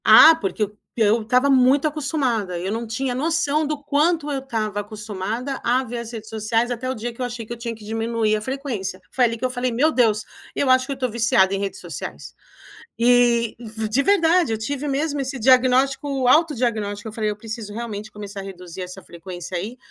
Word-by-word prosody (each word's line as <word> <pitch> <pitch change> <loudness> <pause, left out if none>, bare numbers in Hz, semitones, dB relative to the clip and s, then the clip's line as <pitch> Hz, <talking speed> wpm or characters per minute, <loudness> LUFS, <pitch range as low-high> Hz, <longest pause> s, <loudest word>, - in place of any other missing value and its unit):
Ah, 325 - +9
porque 210 -3 -2
eu 210 0 -5 0.2
eu 225 0 +3
estava 250 +5 +2
muito 270 +2 +4
acostumada, 265 - -1
eu 185 +2 -3
não 225 +3 -2
tinha 245 +3 -2
noção 310 +1 +1
do 300 -1 -3
quanto 300 +2 +1
eu 280 -2 -1
estava 215 -6 -2
acostumada 215 +5 -4
a 255 +2 +2
ver 240 0 -5
as 235 -1 -7
redes 220 -2 -8
sociais, 225 +2 0
até 245 +1 -3
o - - 0
dia 235 0 -5
que 230 - -10
eu - - 0
achei 240 -2 -5
que 235 - -6
eu - - -8
tinha 235 0 -4
que 215 -2 -13
diminuir 225 0 0
a 210 - -2
frequência. 230 -7 -4
Foi 255 - +1
ali 230 -1 +2
que 225 - -12
eu - - +1
falei: 250 0 -1
"Meu 265 +7 +3
Deus, 225 -7 +2 0.3
eu 280 - 0
acho 255 0 +5
que 280 - -6
eu 275 - -3
tô 255 -1 -1
viciada 215 -4 +3
em - - -2
redes 200 -1 -4
sociais". - - -7 0.6
E 240 -1 +3 0.3
de 250 +6 +2
verdade, 340 - +3
eu 220 - -1
tive 280 +6 -3
mesmo 285 +1 -1
esse 265 0 -3
diagnóstico, 260 +2 +3
autodiagnóstico, 235 -8 +2
eu - - -8
falei: 215 -1 -1
"Eu 210 - -4
preciso 220 -1 -7
realmente 215 -1 -5
começar 205 -1 -8
a - - -6
reduzir 185 -2 -8
essa 185 +1 -8
frequência 175 +1 -8
aí". 210 +8 -4
235 Hz, 210 wpm, -22 LUFS, 215-270 Hz, 0.6 s, Ah